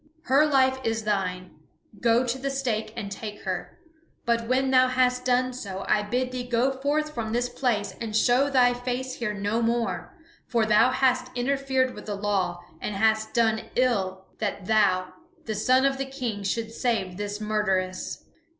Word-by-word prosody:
Her 275 +4 +4
life 265 -2 +3
is 225 0 -1
thine; 185 -5 -2 0.4
go 235 +3 +3
to 245 +2 -2
the 275 +1 -2
stake 245 -6 -2
and 200 -1 -5
take 210 +1 -7
her. 185 -2 -4 0.5
But 235 -1 +1
when 260 +2 +2
thou 255 0 +6
hast 250 -1 +1
done 255 0 +2
so 195 -6 -6
I 210 - +3
bid 250 +4 -1
thee 255 -1 -3
go 245 +2 +2
forth 290 +3 -1
from 225 -3 -3
this 245 +1 +1
place 210 -7 -1
and 220 -2 -4
show 250 +5 +4
thy 250 -3 +4
face 250 +1 -3
here 210 -3 -2
no 205 +3 -1
more. 235 +10 -1 0.3
For 230 -3 +2
thou 215 +3 +5
hast 255 -1 +1
interfered 265 0 +1
with 210 - -10
the 205 - -2
law, 195 -3 -1 0.2
and 210 - -3
hast 220 +2 +1
done 225 -2 +2
ill 190 -7 0
that 205 -3 -3
thou, 185 -3 +2 0.3
the 220 - -2
son 255 +5 +3
of 270 0 +1
the 270 - -1
King, 245 -6 -4
should 225 +3 -2
save 225 -7 -1
this 205 0 -4
murderess. 195 -4 -1
230 Hz, 175 wpm, -26 LUFS, 210-255 Hz, 0.5 s, thou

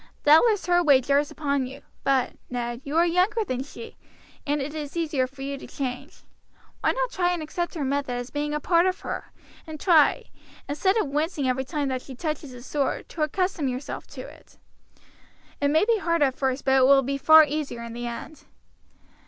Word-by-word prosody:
Doubtless 385 +8 +5
her 350 0 +3
way 285 -6 +5
jars 280 +3 +1
upon 280 -3 -1
you; 270 +2 -11 0.2
but, 270 -2 +2 0.2
Ned, 240 0 -4
you 290 +3 -3
are 340 - +5
younger 365 +6 +2
than 255 -6 -3
she, 290 +11 -10 0.5
and 290 +1 +1
it 285 +2 -4
is 300 0 -6
easier 300 -6 0
for 270 +1 -10
you 275 0 -4
to - - -10
change. 270 +2 -6 0.6
Why - - +2
not - - -2
try 355 -1 +1
and 340 -3 -3
accept 345 +3 -4
her 305 - -2
method 275 -1 -1
as 245 +1 -5
being 295 0 -2
a 300 - -1
part 340 +3 +3
of 370 0 -2
her, - - -6 0.4
and 310 -1 -7
try, 320 -5 +4 0.4
instead 375 +9 +1
of 435 - +2
wincing 295 0 -1
every 260 +1 0
time 290 0 -2
that 255 -1 -2
she 265 - -10
touches 305 -1 -4
the 245 -1 -11
sore, 280 0 -1
to 320 - -7
accustom 355 0 0
yourself 255 +2 -5
to - - -9
it. - - -14 1.0
It 285 - +3
may 315 +6 +3
be 455 -1 +2
hard 335 -4 +1
at 270 -2 +2
first, 265 0 -2
but 265 0 +4
it 260 - +5
will 275 0 +6
be 275 +2 -2
far 315 +2 +8
easier 290 -5 -4
in 235 0 -7
the 240 0 -5
end." 240 +6 -8
290 Hz, 205 wpm, -25 LUFS, 265-330 Hz, 1.0 s, far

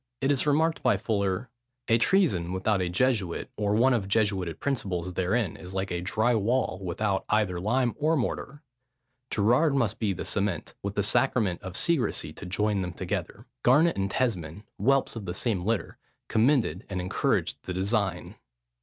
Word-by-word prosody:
It 135 +1 +1
is 140 +1 +1
remarked 160 +3 +2
by 125 - +3
Fuller, 100 +1 -1 0.4
"A 115 +1 +4
treason 115 - +2
without 95 +1 +1
a 90 - -1
Jesuit, 100 -2 0
or 105 0 0
one 125 +4 +4
of 105 -5 0
Jesuited 100 -5 0
principles, 95 -10 -2
therein, 95 +2 0
is 90 +1 -9
like 95 0 -2
a 85 0 -2
drie 110 +6 +1
wall, 115 -2 0
without 95 +3 -1
either 105 -5 +1
lime 120 +5 +1
or 155 +2 +2
mortar; 145 +3 -3 0.7
Gerard 125 +8 +3
must 115 -6 0
be 105 -3 +1
the 95 - -4
cement, 100 -5 -2
with 100 +1 -4
the 100 - +1
sacrament 105 -3 +1
of 95 -1 -7
secrecie 150 -11 0
to - - -9
join 105 +2 +1
them 90 -2 -4
together: 95 +4 -4 0.2
Garnet 150 +7 +4
and 95 0 -1
Tesmond, 100 -7 -2 0.2
(whelps 135 +6 +2
of 110 -3 -6
the 90 -1 -4
same 100 -6 -1
litter,) 115 0 -2 0.3
commended 110 - +2
and 95 -2 -3
encouraged 90 +1 0
the 90 - -3
designe." 100 +1 -1
105 Hz, 170 wpm, -27 LUFS, 95-125 Hz, 0.7 s, A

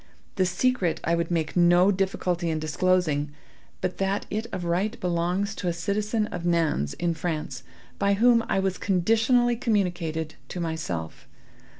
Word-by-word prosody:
The 185 -2 +2
secret 185 -1 +1
I 170 - +1
would 170 -1 0
make 160 -3 -1
no 175 +2 +5
difficulty 185 -3 -1
in 160 - 0
disclosing, 155 -2 +1 0.5
but 185 0 -3
that 195 +1 0
it 220 +2 -2
of 180 -2 -4
right 190 +7 -1
belongs 180 +4 0
to 190 - -5
a 175 - +1
citizen 210 +5 -1
of 175 - -4
Nantz, 165 - +1
in 170 -1 0
France, 155 - -4 0.4
by 200 0 +3
whom 230 +2 +4
it 195 - +1
was 190 -1 -1
conditionally 225 +6 +2
communicated 175 -8 -1 0.2
to 180 - -5
myself. 155 - -4
180 Hz, 155 wpm, -26 LUFS, 170-200 Hz, 0.5 s, no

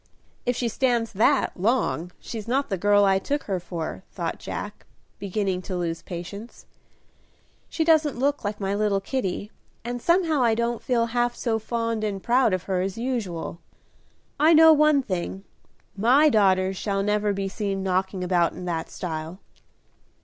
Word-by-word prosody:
"If 245 - +2
she 240 - -1
stands 235 -1 0
that 245 +8 +2
long 180 - 0
she's 220 -2 -7
not 270 +4 0
the 195 - 0
girl 205 +1 +4
I 190 -1 +3
took 290 +8 -2
her 190 -3 -2
for," 165 - -5
thought - - -4
Jack, - - -7 0.3
beginning 195 -1 -2
to 185 - -2
lose 165 -2 -3
patience. 200 +6 -8 1.0
"She 325 - -1
doesn't 310 -4 +3
look 280 +2 0
like 205 0 -3
my 195 -1 -1
little 205 -1 +1
Kitty, 205 -2 -3 0.3
and 240 0 -4
somehow 335 -3 +2
I 230 -2 +3
don't 235 0 -1
feel 235 -2 +1
half 240 0 +1
so 225 -2 -1
fond 230 0 -2
and 200 -3 -3
proud 245 -1 +3
of 185 -1 -1
her 185 -2 -1
as 190 +2 -3
usual. 220 -10 -3 0.8
I 315 +3 +6
know 320 0 +8
one 300 -2 +4
thing, 190 -2 -4 0.5
my 255 +9 +5
daughters 190 -4 +3
shall 195 -1 -1
never 210 0 +1
be 195 -1 -2
seen 195 -1 -3
knocking 190 0 -1
about 175 -2 +2
in 180 - -8
that 165 -2 -3
style." 160 +1 -5
210 Hz, 165 wpm, -25 LUFS, 190-245 Hz, 1.0 s, know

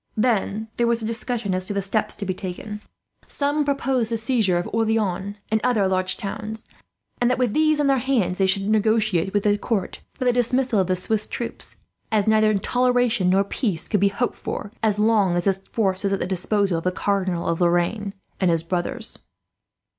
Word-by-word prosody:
"Then 220 -2 0
there 235 - +2
was 235 -1 +1
a - - -2
discussion 225 -2 -2
as 185 0 -1
to 205 - -3
the 200 - +1
steps 205 +2 0
to 200 - -5
be 185 - -1
taken. 205 +3 -6 0.5
Some 290 +1 0
proposed 270 -4 0
the 230 - 0
seizure 225 -6 +1
of 175 - -2
Orleans 210 -3 0 0.2
and 220 0 +2
other 225 -6 +2
large 185 0 0
towns; 215 +2 -5 0.5
and 245 - +3
that, 250 - +1
with 245 -4 +1
these 310 -1 +3
in 295 - +2
their 275 -1 +3
hands, 230 -9 0
they 190 - +3
should 195 +1 +1
negotiate 215 -4 +2
with 205 0 0
the 205 0 +2
court 210 -5 -2 0.2
for 255 - -4
the 245 - +4
dismissal 245 -1 +1
of 185 - +1
the 185 - +1
Swiss 210 +4 0
troops; 235 - -6 0.3
as 210 -2 +2
neither 215 0 +4
toleration 245 -3 +2
nor 195 +2 +4
peace 200 - -2
could 210 - +1
be 200 - +4
hoped 220 +5 -2
for, 205 - -5
as 215 -2 +2
long 210 -4 +3
as 175 - 0
this 195 -1 +2
force 190 -1 -1
was 200 0 +1
at 195 - 0
the - - -1
disposal 190 0 0
of - - -10
the 185 - +1
Cardinal 185 -3 -1
of 165 +1 -1
Lorraine 175 +4 +1 0.2
and 185 - +2
his 165 -1 +2
brothers. 175 +1 -3
210 Hz, 205 wpm, -23 LUFS, 190-230 Hz, 0.5 s, the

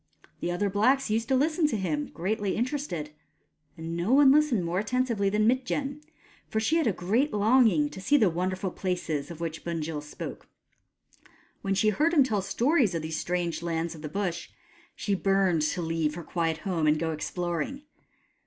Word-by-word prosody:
The - - -2
other 180 +4 0
blacks 220 +6 +2
used 225 +1 0
to 265 - +2
listen 310 +4 +2
to 260 - -1
him, 155 -6 -2
greatly 200 +3 -2
interested; 235 - -3 0.7
and 165 +1 -5
no 175 +8 0
one 275 -1 +7
listened 280 - +3
more 175 +2 0
attentively 230 -2 0
than 210 +1 +1
Mitjen, 270 +4 0 0.5
for 220 - 0
she 295 +9 +2
had 320 - +2
a - - +4
great 215 - 0
longing 240 +7 +4
to 190 - -9
see 290 +10 +3
the 220 -7 +4
wonderful 185 +2 -2
places 175 -7 -3
of 170 -2 -8
which 165 -1 -4
Bunjil 160 -3 -3
spoke. 145 - -8 1.1
When 195 0 -1
she 215 +2 +3
heard 315 - +1
him 285 - +7
tell 215 -6 0
stories 230 - +2
of 165 - -2
these 160 0 -3
strange 175 -2 -2
lands 170 0 -2
of 160 - -11
the 150 - -5
Bush, 175 -1 -3 0.5
she 205 - -2
burned 195 -3 +2
to 155 +3 -1
leave 160 -2 -1
her 175 - -6
quiet 165 -1 -1
home 170 -5 0
and 150 +1 +4
go 160 +1 -1
exploring. 175 - -3
195 Hz, 180 wpm, -27 LUFS, 165-245 Hz, 1.1 s, one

